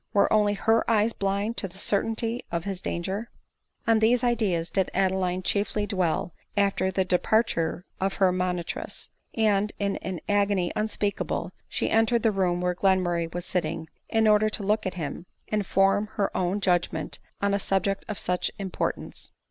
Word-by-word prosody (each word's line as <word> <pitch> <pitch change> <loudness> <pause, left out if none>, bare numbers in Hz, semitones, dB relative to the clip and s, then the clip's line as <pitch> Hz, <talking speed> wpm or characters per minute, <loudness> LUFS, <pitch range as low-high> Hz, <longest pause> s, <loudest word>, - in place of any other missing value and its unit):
Were 200 - +4
only 210 -1 +3
her 225 +3 +2
eyes 225 0 +3
blind 200 +3 -1
to 195 - 0
the 185 - -13
certainty 225 +4 0
of 170 -1 -1
his 195 -1 -4
danger? 190 +7 -3 0.6
On 225 -2 +4
these 235 +3 +3
ideas 205 -9 +1
did 190 -2 +1
Adeline 185 -1 +1
chiefly 205 +2 0
dwell 180 -4 -1 0.2
after 200 -1 +2
the 190 0 0
de 180 -1 +2
parture 180 -7 +1 0.2
of 195 0 0
her 190 -2 +4
moriitress; 180 -2 -3 0.2
and 210 -2 +2
in 200 -1 -1
an 185 -2 -5
agony 200 -3 +2
unspeakable 210 -1 -1 0.2
she - - -1
entered 225 +1 +3
the 225 - +4
room 180 -3 +1
where 180 0 +1
Glenmurray 175 -3 +1
was 175 +1 -4
sitting, 160 -2 -2 0.2
in 225 -1 +3
order 215 0 +5
to 215 - -3
look 210 +1 +1
at 185 - -4
him, 170 +1 -5 0.2
and 210 -3 0
form 195 +2 +3
her 205 -3 -1
own 185 +3 0
judgment 175 -4 0 0.2
on 200 0 +1
a 200 - +2
subject 195 0 0
of 210 - -4
such 180 0 0
importance. 195 -2 -4
195 Hz, 170 wpm, -26 LUFS, 180-215 Hz, 0.6 s, order